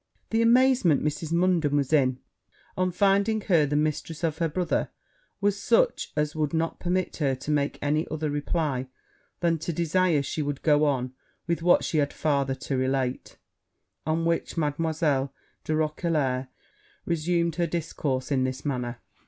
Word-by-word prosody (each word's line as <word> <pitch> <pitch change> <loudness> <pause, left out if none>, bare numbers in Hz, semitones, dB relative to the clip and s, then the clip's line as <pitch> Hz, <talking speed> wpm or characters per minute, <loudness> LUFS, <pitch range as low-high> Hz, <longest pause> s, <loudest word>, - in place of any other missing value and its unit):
The 225 0 +2
amazement 240 - +4
Mrs. 150 +1 -2
Munden 170 -4 +2
was 140 +1 0
in, 130 -4 +3 0.6
on 185 0 +1
finding 200 +4 +2
her 165 -8 +3
the 145 - -1
mistress 155 +2 -1
of 160 -1 -1
her 165 -1 +1
brothers, 175 +3 0 0.5
was 200 -1 0
such - - +2
as 150 +1 -1
would 155 0 -1
not 165 +1 -1
permit 185 +1 -1
her 140 -4 +1
to 135 +4 -5
make 145 -1 0
any 150 +2 +1
other 155 -1 -2
reply 145 -3 -1 0.5
than 165 -2 +2
to 165 - -3
desire 170 -1 +2
she 155 - -3
would 145 -1 -3
go 150 -1 +4
on 130 -3 0 0.3
with 170 -1 -1
what 175 +1 +4
she 155 - 0
had 145 -1 0
farther 140 -3 0
to 135 +1 -4
relate: 130 0 -1 0.7
on 160 +1 0
which 170 0 -1
Mademoiselle 150 -3 0 0.3
de 155 - -1
Roquelair 150 -4 0 0.6
resumed 170 0 0
her 170 -1 +1
discourse 150 -5 -2
in 130 -2 +2
this 130 +2 -3
manner. 125 -4 -3
155 Hz, 160 wpm, -26 LUFS, 140-170 Hz, 0.7 s, amazement